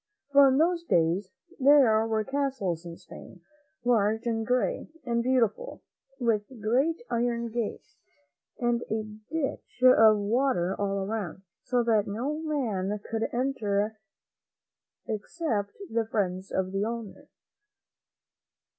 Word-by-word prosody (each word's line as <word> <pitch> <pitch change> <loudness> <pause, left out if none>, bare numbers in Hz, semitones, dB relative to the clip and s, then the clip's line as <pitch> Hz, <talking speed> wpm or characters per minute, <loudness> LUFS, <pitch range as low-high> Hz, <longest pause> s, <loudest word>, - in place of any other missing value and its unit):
For 280 0 +7
in 265 0 +3
those 335 +2 +2
days 175 - +1 0.3
there 255 -6 +5
were 220 -1 0
castles 260 - -2
in 170 0 -8
Spain, 180 0 -13 0.4
large 220 -1 +2
and 225 -1 0
gray 250 0 0 0.2
and 235 -1 0
beautiful, 255 - 0 0.4
with 230 -4 +2 0.2
great 270 - +1
iron 235 0 0
gates 235 0 -4 0.6
and 240 -1 0
a 220 0 -1 0.3
ditch 290 -4 -4
of 225 -4 +7
water 205 -3 +1
all 195 -1 -1
around, 200 -3 -4 0.2
so 250 -1 0
that 220 -3 +2
no 255 +9 -3
man 220 -11 -2
could 225 0 -1
enter 220 -4 -1 1.1
except 215 -2 -3
the 225 -4 -1
friends 190 -3 -2
of 185 0 -1
the 195 +1 -1
owner. 230 -2 -6
225 Hz, 120 wpm, -28 LUFS, 205-255 Hz, 1.1 s, For